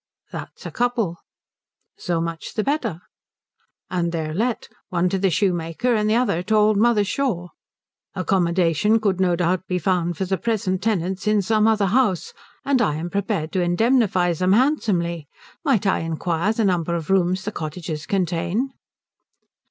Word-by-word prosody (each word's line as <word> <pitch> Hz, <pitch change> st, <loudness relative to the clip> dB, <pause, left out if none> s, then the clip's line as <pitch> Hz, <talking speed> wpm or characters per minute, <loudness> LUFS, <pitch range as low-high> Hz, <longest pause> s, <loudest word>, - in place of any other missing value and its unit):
"That's -, -, -8 dB
a -, -, -5 dB
couple." 235 Hz, -8 st, -1 dB, 0.8 s
"So 175 Hz, -2 st, -2 dB
much 165 Hz, 0 st, -5 dB
the 215 Hz, -, 0 dB
better." 235 Hz, -, -1 dB, 0.9 s
"And 170 Hz, -2 st, 0 dB
they're 160 Hz, -2 st, -3 dB
let. 230 Hz, +6 st, -1 dB, 0.2 s
One 180 Hz, 0 st, +1 dB
to 195 Hz, -, -1 dB
the 195 Hz, 0 st, +2 dB
shoemaker, 175 Hz, +5 st, 0 dB
and 215 Hz, -1 st, +1 dB
the 220 Hz, -, +3 dB
other 235 Hz, -8 st, +1 dB
to 215 Hz, +4 st, 0 dB
old 215 Hz, 0 st, +4 dB
mother 220 Hz, -1 st, +4 dB
Shaw." 200 Hz, -6 st, -2 dB, 0.7 s
"Accommodation 185 Hz, +3 st, +2 dB
could 200 Hz, -4 st, 0 dB
no 180 Hz, -2 st, +3 dB
doubt 180 Hz, +1 st, 0 dB
be 180 Hz, -, 0 dB
found 175 Hz, -1 st, 0 dB
for 190 Hz, -, -1 dB
the 190 Hz, 0 st, -1 dB
present 195 Hz, -5 st, -1 dB
tenants 190 Hz, -2 st, -1 dB
in 210 Hz, -1 st, +3 dB
some 215 Hz, +2 st, +2 dB
other 215 Hz, -2 st, +3 dB
house, 200 Hz, -3 st, +1 dB, 0.3 s
and 275 Hz, -3 st, +2 dB
I 150 Hz, -7 st, +1 dB
am 170 Hz, +3 st, -4 dB
prepared 200 Hz, -5 st, -2 dB
to 185 Hz, -, 0 dB
indemnify 185 Hz, -1 st, +2 dB
them 185 Hz, +3 st, +2 dB
handsomely. 190 Hz, -, +1 dB, 0.4 s
Might 265 Hz, -, +2 dB
I 195 Hz, -, +2 dB
inquire 165 Hz, +3 st, -1 dB
the 225 Hz, -1 st, 0 dB
number 170 Hz, -3 st, +1 dB
of 165 Hz, +2 st, -3 dB
rooms 185 Hz, 0 st, +2 dB
the 210 Hz, -, -2 dB
cottages 155 Hz, -2 st, -5 dB
contain?" 185 Hz, -, -1 dB
185 Hz, 160 wpm, -22 LUFS, 170-215 Hz, 0.9 s, old